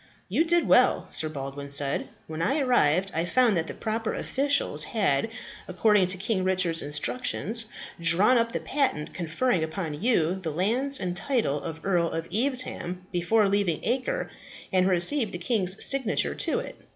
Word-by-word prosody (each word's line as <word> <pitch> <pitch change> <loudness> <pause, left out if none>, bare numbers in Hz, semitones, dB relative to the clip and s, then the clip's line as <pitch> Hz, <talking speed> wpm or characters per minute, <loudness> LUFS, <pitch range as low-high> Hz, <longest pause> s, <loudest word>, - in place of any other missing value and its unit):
"You 325 - +1
did 345 0 +1
well," - - +3
Sir 155 - +3
Baldwin 140 -1 -7
said. 140 0 +2 0.2
"When 160 0 -6
I 270 - 0
arrived, 195 - +2
I 165 - -1
found 240 +2 +2
that 165 -1 -2
the - - -7
proper 225 +1 -3
officials, 275 - +1
had, 200 -4 0 0.4
according 190 +1 +2
to 185 +1 +2
King 195 -1 -1
Richard's 185 -3 +1
instructions, 225 +8 -2 0.3
drawn 170 +9 +4
up 230 0 -1
the - - -3
patent 265 - -2
conferring 175 +3 -1
upon 160 -2 -5
you 190 -8 +1
the 175 -4 -4
lands 235 - +1
and 180 -1 -3
title 195 - -1
of 160 -1 -8
Earl 175 -3 +1
of 165 0 -5
Evesham, 225 -7 -1
before 195 +4 +1
leaving 195 -5 0
Acre, 265 - -2 0.4
and 185 -1 +3
had 190 - +1
received 210 +7 +3
the - - -3
king's 190 0 +1
signature 265 -5 +2
to - - -1
it. - - -6
190 Hz, 165 wpm, -26 LUFS, 165-240 Hz, 0.4 s, drawn